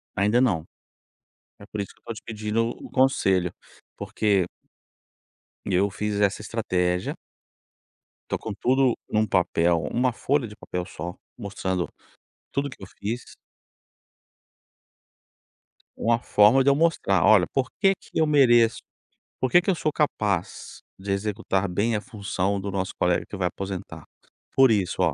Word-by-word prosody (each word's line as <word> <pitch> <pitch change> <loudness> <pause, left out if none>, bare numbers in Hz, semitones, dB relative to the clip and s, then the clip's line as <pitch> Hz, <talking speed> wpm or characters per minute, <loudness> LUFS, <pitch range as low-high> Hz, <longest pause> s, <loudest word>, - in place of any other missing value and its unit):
Ainda 105 +5 +3
não. 95 -12 +2 1.0
É 100 - -13
por 105 0 -5
isso 100 - -4
que - - -30
eu - - -53
tô 115 - -5
te 110 - -10
pedindo 110 0 -1
O - - -8
o - - -15
conselho 95 -9 +2 0.4
porque 100 -4 +1 1.2
e - - -2
eu 100 +3 +3
fiz 105 +1 -3
essa 105 0 +1
estratégia. 90 -5 -1 1.1
Tô - - 0
com 110 - -5
tudo 130 +2 +2
num 110 0 +2
papel, 85 -2 +2
uma 125 0 +1
folha 135 +1 0
de 105 - -12
papel 90 -3 -5
só 90 +2 -7 0.2
mostrando 95 -4 -3 0.6
tudo 140 +1 -1
o - - -7
que 130 - -13
eu 95 - -8
fiz. 115 +4 -5 2.6
Uma 115 0 +2
forma 115 +4 +5
de 140 - +4
eu - - +3
mostrar, 145 - +2
olha, 105 -5 +6
por 135 -2 0
que 195 -1 +5
que - - -20
eu 160 - +4
mereço? 120 -6 +4 0.6
Por 130 - 0
que 175 - +6
que 185 - -3
eu - - 0
sou 155 -1 -1
capaz, 105 - -2 0.2
de 100 +1 -4
executar 100 -1 -1
bem 105 +6 0
a 105 - -1
função 100 -4 -2
do 100 +1 -4
nosso 95 -1 -3
colega 90 -1 +1
que 100 - -8
vai 90 - +1
aposentar? 95 +1 -6 0.5
Por 135 -1 +6
isso, 95 -4 0
ó. 85 -4 +3
105 Hz, 160 wpm, -25 LUFS, 95-120 Hz, 2.6 s, olha